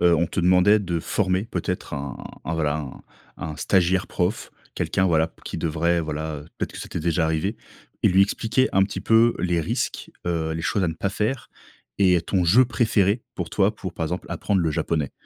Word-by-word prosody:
heu, 85 -1 +5
on 85 +1 +2
te 90 - -2
demandait 90 +4 +5
de 85 -5 -2
former 95 +2 0
peut-être 90 -8 -4
un 70 -2 -5 0.3
un 80 - -2
voilà, 75 -3 +1
un 70 -4 -8 0.3
un 75 -2 -6
stagiaire 90 +3 +2
prof. 90 +6 -2 0.2
Quelqu'un 95 - 0
voilà, 80 -2 +2
qui - - -5
devrait 85 +1 +1
voilà 80 -1 -4 0.2
peut-être - - -3
que - - -9
ça - - -7
t'es - - -4
déjà 85 +1 +1
arrivé. 80 +7 -1 0.5
Et - - +5
lui 95 +2 +5
expliquer 115 +6 +1
un 95 - +4
petit 95 - -2
peu 115 +1 +4
les 85 -2 +1
risques. 80 - -3 0.2
Heu, 80 -2 -1
les 80 0 -4
choses 100 +4 0
à - - +1
ne 80 - -3
pas 90 +5 -1
faire 110 +6 -2 0.5
et 90 -3 +4
ton 90 +2 0
jeu 110 +10 +6
préféré 110 -3 +1
pour - - -4
toi 100 +1 +2
pour, 95 -4 -6
par 80 - -2
exemple, 90 +3 -4
apprendre 100 -2 0
le 80 -2 +1
japonais. 75 -2 -1
90 Hz, 205 wpm, -24 LUFS, 80-100 Hz, 0.5 s, jeu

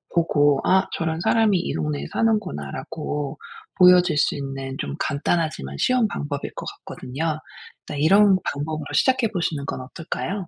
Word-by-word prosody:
보고 145 -4 +3
'아 190 0 +3
저런 160 -1 -2
사람이 220 0 +3
이 - - -3
동네에 75 -3 -2
사는구나.'라고 150 - -2 0.4
보여줄 180 -3 +6
수 - - +2
있는 135 -1 -5
좀 - - -3
간단하지만 155 - -1
쉬운 250 -3 +3
방법일 145 -7 -4
것 - - -6 0.2
같거든요. 155 +5 -3 0.5
일단 145 - -6
이런 195 +5 +5
방법으로 155 +1 -3
시작해 260 -3 +3
보시는 165 -7 -2
건 - - -4
어떨까요? 170 +7 -5
160 Hz, 340 characters per minute, -23 LUFS, 140-190 Hz, 0.5 s, 보여줄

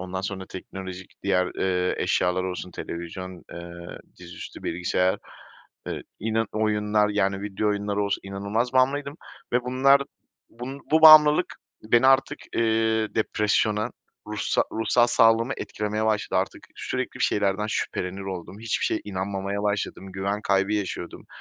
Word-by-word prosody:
ondan 95 0 -4
sonra 95 -1 -5
teknolojik 95 0 -9
diğer, 90 -2 +1
eee, 90 -1 0
eşyalar 90 0 +1
olsun, 90 0 -4
televizyon, 90 +2 -7
eee, 85 0 -9 0.2
dizüstü 85 -1 -10
bilgisayar, 90 +2 0 0.7
eee, - - -4 0.2
inan 110 +1 0
oyunlar 105 -1 +1
yani, 100 -1 0
video 105 +1 -1
oyunları 105 0 -1
olsun, 100 - -1
inanılmaz 100 +5 -2
bağımlıydım 140 +3 +1 0.4
ve 125 0 +2
bunlar, 135 +2 +4 0.5
bun 130 +4 -7
bu 160 0 +5
bağımlılık 155 +1 +8 0.3
beni 120 +4 +4
artık, 135 0 +4 0.2
eee, 110 -1 +1
depresyona, 105 +1 +1 0.4
ruhsa - - 0
ruhsal 120 +2 +3
sağlığımı 115 +1 +4
etkilemeye 105 +1 -3
başladı. 105 -1 +1
Artık - - -6
sürekli - - -3
bir - - +2
şeylerden 100 0 +1
şüphelenir 95 -2 -3
oldum. 95 +1 -7
Hiçbir 115 -1 -1
şeye - - 0
inanmamaya 100 +1 -3
başladım. 100 -2 -2
Güven 100 +2 -2
kaybı 100 0 +1
yaşıyordum. 95 -4 -4
105 Hz, 130 wpm, -25 LUFS, 95-115 Hz, 0.7 s, bağımlılık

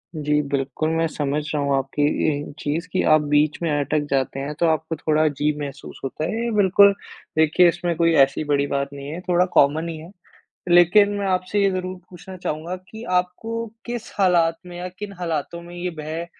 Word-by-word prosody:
जी, 150 -1 +1
बिल्कुल, 140 +2 -2
मैं 165 0 +1
समझ 145 -1 -2
रहा 150 - 0
हूँ 140 -1 +1
आपकी 135 +2 -2 0.2
ये 145 -1 -1
चीज़ 160 +4 -2
कि 185 - +1
आप 155 - +5
बीच 150 +1 +2
में 170 - 0
अटक 145 +1 0
जाते 135 0 0
हैं 140 +2 -4
तो 170 - +3
आपको 160 0 0
थोड़ा 155 0 +1
अजीब 150 0 0
महसूस 140 -2 -7
होता 135 +3 -3
है। 225 +6 -2
ये 235 - -1
बिल्कुल 200 0 +6 0.4
देखिए 160 +3 +5
इसमें 175 0 -2
कोई 165 -1 +3
ऐसी 135 +3 -1
बड़ी 145 -1 +1
बात 140 0 -1
नहीं 140 0 -8
है, 160 +4 -5
थोड़ा 180 -1 +2
कॉमन 150 +4 +3
ही 160 - -5
है। 165 +3 -11 0.6
लेकिन 175 +4 +6
मैं 200 - -2
आपसे 185 +2 0
ये 195 - +3
ज़रूर 185 0 -3
पूछना 185 +1 -10
चाहूँगा 170 0 -4 0.2
कि 220 +1 -9
आपको 205 +6 -1 0.2
किस 240 0 -5
हालात 170 -4 +3
में 175 - -9
या 180 +1 -4
किन 200 +3 -8
हालातों 170 -1 -3
में 175 +1 -11
ये 180 +1 -3
भय 160 +2 -4
165 Hz, 200 wpm, -22 LUFS, 150-180 Hz, 0.6 s, बिल्कुल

